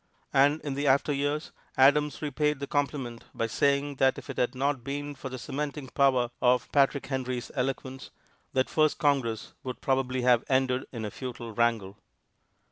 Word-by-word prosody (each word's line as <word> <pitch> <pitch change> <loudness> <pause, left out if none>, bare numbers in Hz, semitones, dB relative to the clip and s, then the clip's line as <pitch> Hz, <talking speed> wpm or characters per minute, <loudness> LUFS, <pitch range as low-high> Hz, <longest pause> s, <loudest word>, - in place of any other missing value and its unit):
And 145 +3 +4
in 145 -2 -4
after 140 +2 +3
years 145 +2 -1 0.3
Adams 145 +3 +4
repaid 150 0 0
the 140 - -3
compliment 140 -4 -2
by 115 - 0
saying 140 +4 +1
that 130 0 +3
if - - -7
it - - -10
had 125 +2 +1
not 135 -1 0
been 145 +2 -4
for 135 -1 -7
the 130 - -6
cementing 140 +1 -4
power 130 -3 +2
of 125 -1 +2
Patrick 140 0 +3
Henry's 130 -2 -3
eloquence, 135 0 -3 0.4
that 130 0 +2
first 155 -1 +2
Congress 135 -8 0 0.3
probably 130 -1 0
would 125 - -1
have 120 -2 +5
ended 130 -1 +1
in 115 -3 -5
a 105 - -4
futile 120 -2 -7
wrangle. 110 -4 0
135 Hz, 165 wpm, -28 LUFS, 125-145 Hz, 0.4 s, have